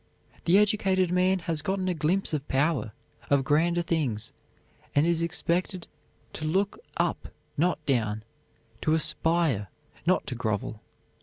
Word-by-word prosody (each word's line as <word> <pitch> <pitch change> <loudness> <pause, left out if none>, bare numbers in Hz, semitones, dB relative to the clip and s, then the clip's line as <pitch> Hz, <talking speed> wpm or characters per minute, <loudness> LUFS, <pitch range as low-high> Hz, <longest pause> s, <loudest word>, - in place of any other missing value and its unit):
The 175 +3 +5
educated 195 -4 +3
man 185 +1 +3
has 165 -3 -1
gotten 190 +1 -1
a 180 - +1
glimpse 170 +3 0
of 145 -2 -2
power, 135 -4 +1 0.4
of 140 -1 +3
grander 170 +5 +2
things, 130 -11 -1 0.6
and 145 +2 +4
he 170 - +3
is 165 -1 +1
expected 175 +2 -1 0.5
to - - -6
look 190 +6 0 0.2
up, - - -1 0.3
not 165 -1 0
down, 110 -6 0 0.6
to 155 - +2
aspire, 160 - +2 0.4
not 185 - +3
to - - -3
grovel. 110 -2 -3
165 Hz, 140 wpm, -27 LUFS, 140-180 Hz, 0.6 s, The